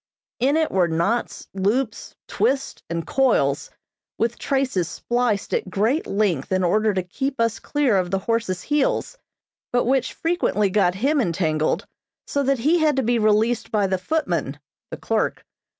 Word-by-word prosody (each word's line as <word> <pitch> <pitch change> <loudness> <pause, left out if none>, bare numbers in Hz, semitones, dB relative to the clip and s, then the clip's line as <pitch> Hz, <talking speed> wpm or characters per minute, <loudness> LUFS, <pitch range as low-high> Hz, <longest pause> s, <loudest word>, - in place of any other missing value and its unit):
In 275 +5 +2
it 320 -1 +1
were 185 -2 +3
knots, 170 +9 -1
loops, 210 +6 -1
twists, 275 0 -1
and 170 0 -3
coils, 215 - +1 0.5
with 230 +1 -1
traces 260 - 0
spliced 240 -4 -1
at - - -1
great 225 - 0
length 195 -9 0
in 185 0 +2
order 215 +5 +2
to 190 -2 -1
keep 265 +9 -4
us 230 -1 +1
clear 280 -8 +1
of 180 -1 0
the 195 - 0
horse's 195 -3 -1
heels, 295 - 0 0.5
but 245 - +2
which 260 0 +1
frequently 325 - 0
got 185 -3 +2
him 275 +8 +1
entangled, 160 -5 0 0.4
so 285 - -1
that 275 0 +1
he 305 +9 +2
had 305 -3 +3
to 265 - +1
be 240 +1 +1
released 215 +2 +2
by 210 -2 +2
the 190 -1 0
footman 175 - -2 0.3
(the - - -6
clerk). - - -1
220 Hz, 160 wpm, -23 LUFS, 185-270 Hz, 0.5 s, were